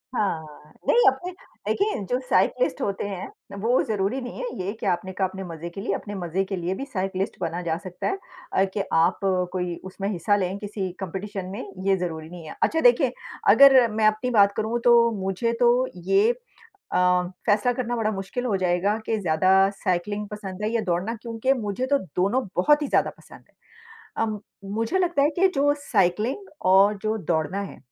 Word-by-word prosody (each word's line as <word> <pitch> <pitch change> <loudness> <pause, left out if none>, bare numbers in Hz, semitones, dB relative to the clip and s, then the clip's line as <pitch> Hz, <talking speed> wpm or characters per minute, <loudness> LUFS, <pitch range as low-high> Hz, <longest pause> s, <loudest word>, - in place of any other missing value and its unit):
हाँ, 205 -4 +2 0.2
हाँ। 150 0 -16
नहीं, 480 - +5
अपने 310 +8 +1 0.4
देखिए 410 - 0
जो 250 - +1
साइक्लिस्ट - - +2
होते 200 -4 -2
हैं, 190 -2 -5 0.3
वो 235 +5 +2
ज़रूरी 210 +3 -1
नहीं 245 - -7
है - - -3 0.2
ये 200 - -2
कि - - -5
आपने 185 0 0
कहा 190 0 0
अपने 190 +1 -7
मज़े 170 -1 -7
के 195 +3 -8
लिए, 195 - -1
अपने 205 -1 -6
मज़े 180 +1 -1
के 195 - -3
लिए 180 +1 -2
भी 275 - -5
साइक्लिस्ट 195 -5 -3
बना 170 0 -2
जा 165 -2 -1
सकता 185 +1 -4
है 390 - -1 0.4
अ, 190 - +4
कि 200 - 0
आप 165 +3 +3 0.3
कोई 180 -2 -2
उसमें 195 +1 -5
हिस्सा 200 +2 +1
लें 190 0 -1
किसी 200 -3 -4
कॉम्पिटिशन 195 +1 -5
में, 200 - -5 0.2
ये 195 -1 +4
ज़रूरी 160 -3 -4
नहीं 175 -2 -10
है। - - -8
अच्छा 320 - +2
देखिए - - +5 0.4
अगर 270 -3 +8
मैं 215 0 +1
अपनी 215 +4 +1
बात 200 0 +6
करूँ 225 +2 -1
तो 235 -1 +6
मुझे 195 +5 -1
तो 245 +1 +4 0.2
ये 420 +4 +5 0.6
अ, 180 0 +3 0.2
फैसला 215 +4 +3
करना 240 -1 -2
बड़ा 215 -1 0
मुश्किल 195 +6 -4
हो 205 -5 +1
जाएगा 185 +3 +1
कि 220 -1 0
ज़्यादा 170 +1 +2 0.3
साइक्लिंग 205 +3 -1
पसंद 205 -2 -7
है 215 - 0
या 230 - +1
दौड़ना, 180 +6 0
क्योंकि 230 +3 0
मुझे 210 +4 -2
तो 280 +1 +3 0.2
दोनों 205 +7 +1
बहुत 295 +11 +4
ही 285 - -1
ज़्यादा - - +2
पसंद - - -16
है। - - -40 0.7
अम, 215 -2 -3 0.3
मुझे 230 - 0
लगता 345 -5 +2
है 290 - +4
कि 380 +2 +5
जो 285 +1 +3
साइक्लिंग 230 - 0 0.2
और 200 +2 +6
जो 215 +1 0
दौड़ना 170 +4 0
है, 195 - -8
205 Hz, 195 wpm, -24 LUFS, 185-240 Hz, 0.7 s, अगर